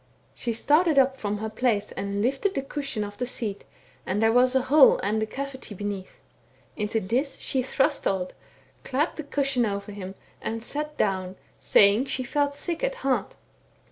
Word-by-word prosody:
* -, -, -36 dB
She 240 Hz, -, -3 dB
started 300 Hz, +7 st, +3 dB
up 265 Hz, 0 st, +5 dB
from 210 Hz, -5 st, -3 dB
her 220 Hz, +1 st, -4 dB
place 225 Hz, -3 st, 0 dB
and 200 Hz, +1 st, -3 dB
lifted 275 Hz, -, 0 dB
the 270 Hz, -, -1 dB
cushion 275 Hz, -6 st, -3 dB
oif 205 Hz, 0 st, -7 dB
the 250 Hz, -, -1 dB
seat^ 220 Hz, -5 st, -2 dB, 0.4 s
and 190 Hz, +2 st, -1 dB
there 225 Hz, +1 st, +4 dB
was 250 Hz, +2 st, +4 dB
a 260 Hz, -, +3 dB
hole 280 Hz, +1 st, +6 dB
and 215 Hz, +3 st, 0 dB
a 220 Hz, -, -1 dB
cavity 265 Hz, -3 st, -6 dB
heneath: 200 Hz, -1 st, -6 dB, 0.5 s
into 210 Hz, +1 st, -1 dB
this 250 Hz, +9 st, -1 dB
she 260 Hz, -, -1 dB
thrust 270 Hz, +3 st, +1 dB
Odd, 185 Hz, -2 st, -1 dB, 0.5 s
clapped 285 Hz, +5 st, -1 dB
the 310 Hz, -, -4 dB
cushion 275 Hz, -3 st, +1 dB
over 200 Hz, -1 st, -3 dB
him, 195 Hz, -1 st, -7 dB, 0.3 s
and 225 Hz, 0 st, -4 dB
sat 300 Hz, +3 st, -4 dB
down, 190 Hz, -2 st, 0 dB, 0.3 s
sajing 205 Hz, +6 st, +5 dB
she 260 Hz, -, -1 dB
felt 285 Hz, +2 st, 0 dB
sick 340 Hz, +7 st, -2 dB
at -, -, 0 dB
heart. -, -, 0 dB
245 Hz, 180 wpm, -26 LUFS, 205-275 Hz, 0.5 s, hole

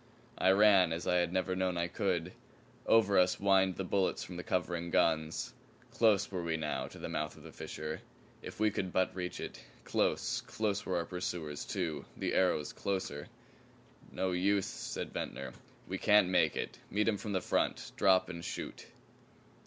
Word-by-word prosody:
I 95 Hz, -, +4 dB
ran 95 Hz, -3 st, +6 dB
as 85 Hz, -, -4 dB
I 90 Hz, -, +3 dB
had 85 Hz, -1 st, +1 dB
never 95 Hz, 0 st, 0 dB
known 90 Hz, -1 st, 0 dB
I 85 Hz, 0 st, 0 dB
could. 90 Hz, -2 st, -1 dB, 0.5 s
Over 105 Hz, -4 st, +5 dB
us 90 Hz, 0 st, +4 dB
whined 95 Hz, -2 st, +3 dB
the 95 Hz, -, -3 dB
bullets 95 Hz, +1 st, 0 dB
from 90 Hz, -, -8 dB
the 90 Hz, -, -4 dB
covering 85 Hz, -1 st, -1 dB
guns. 80 Hz, -1 st, +1 dB, 0.4 s
Close 105 Hz, -3 st, +3 dB
were 90 Hz, -2 st, -2 dB
we 80 Hz, -1 st, -1 dB
now 75 Hz, -1 st, -2 dB
to -, -, -12 dB
the -, -, -5 dB
mouth 75 Hz, 0 st, -3 dB
of -, -, -14 dB
the -, -, -10 dB
fissure. 80 Hz, 0 st, -6 dB, 0.4 s
If -, -, -9 dB
we 110 Hz, -1 st, +3 dB
could 95 Hz, -2 st, -2 dB
but 95 Hz, 0 st, +1 dB
reach 90 Hz, -1 st, -4 dB
it. -, -, -6 dB, 0.2 s
Close, -, -, 0 dB
close 105 Hz, -2 st, -1 dB
were -, -, 0 dB
our 85 Hz, -, -1 dB
pursuers, 85 Hz, -5 st, -4 dB
too 80 Hz, -7 st, -3 dB
the -, -, -1 dB
arrows 90 Hz, -5 st, +2 dB
closer. 95 Hz, -7 st, -3 dB, 0.8 s
"No 95 Hz, -, -1 dB
use!" 95 Hz, +2 st, +2 dB
said -, -, -5 dB
Ventnor. 65 Hz, -1 st, -4 dB, 0.3 s
"We 95 Hz, 0 st, -3 dB
can't 105 Hz, -3 st, +5 dB
make 95 Hz, -, +3 dB
it. -, -, -4 dB
Meet 105 Hz, +2 st, +1 dB
'em 110 Hz, -2 st, +2 dB
from 105 Hz, 0 st, -5 dB
the 95 Hz, -, +2 dB
front. -, -, 0 dB
Drop 95 Hz, -1 st, +4 dB
and 85 Hz, -2 st, -7 dB
shoot." -, -, -6 dB
90 Hz, 180 wpm, -33 LUFS, 85-100 Hz, 0.8 s, ran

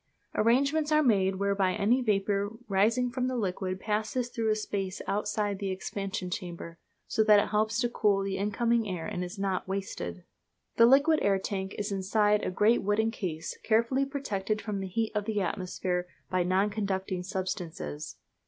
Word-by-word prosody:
Arrangements 280 Hz, +7 st, +2 dB
are 305 Hz, 0 st, +5 dB
made 195 Hz, -6 st, +3 dB
whereby 195 Hz, -1 st, +1 dB
any 215 Hz, +6 st, +2 dB
vapour 205 Hz, -1 st, 0 dB
rising 225 Hz, +5 st, +2 dB
from 255 Hz, 0 st, -1 dB
the 255 Hz, -, -2 dB
liquid 185 Hz, -3 st, -2 dB
passes 215 Hz, +4 st, -1 dB
through 225 Hz, -2 st, -1 dB
a 215 Hz, -, +3 dB
space 195 Hz, -3 st, -3 dB
outside 205 Hz, -1 st, -1 dB
the 195 Hz, -, -2 dB
expansion 190 Hz, -1 st, -4 dB
chambers, 170 Hz, -2 st, -6 dB, 0.3 s
so 220 Hz, -, +1 dB
that 210 Hz, -1 st, +7 dB
it -, -, 0 dB
helps 215 Hz, +2 st, +1 dB
to 245 Hz, -, +2 dB
cool 205 Hz, -4 st, +2 dB
the 195 Hz, -1 st, -2 dB
incoming 225 Hz, +3 st, +1 dB
air 175 Hz, -3 st, -4 dB
and 180 Hz, -, -3 dB
is 180 Hz, +3 st, -7 dB
not 195 Hz, -2 st, -1 dB
wasted. 90 Hz, -, -4 dB, 0.5 s
The 230 Hz, -, +8 dB
liquid 285 Hz, +5 st, +5 dB
air 200 Hz, -1 st, +3 dB
tank 190 Hz, 0 st, -4 dB
is 205 Hz, 0 st, -2 dB
inside 205 Hz, +2 st, +2 dB
a -, -, 0 dB
great 210 Hz, +6 st, +3 dB
wooden 215 Hz, +3 st, +1 dB
case, 165 Hz, -7 st, -4 dB
carefully 235 Hz, +5 st, +2 dB
protected 215 Hz, -7 st, -2 dB
from 210 Hz, -3 st, -3 dB
the 190 Hz, -, -3 dB
heat 220 Hz, +4 st, -1 dB
of 210 Hz, -1 st, -1 dB
the 215 Hz, -1 st, -1 dB
atmosphere 180 Hz, -1 st, -2 dB, 0.2 s
by 185 Hz, -1 st, +2 dB
non 190 Hz, +4 st, +2 dB
conducting 190 Hz, -3 st, -2 dB
substances. 180 Hz, -, -4 dB
205 Hz, 170 wpm, -29 LUFS, 190-225 Hz, 0.5 s, The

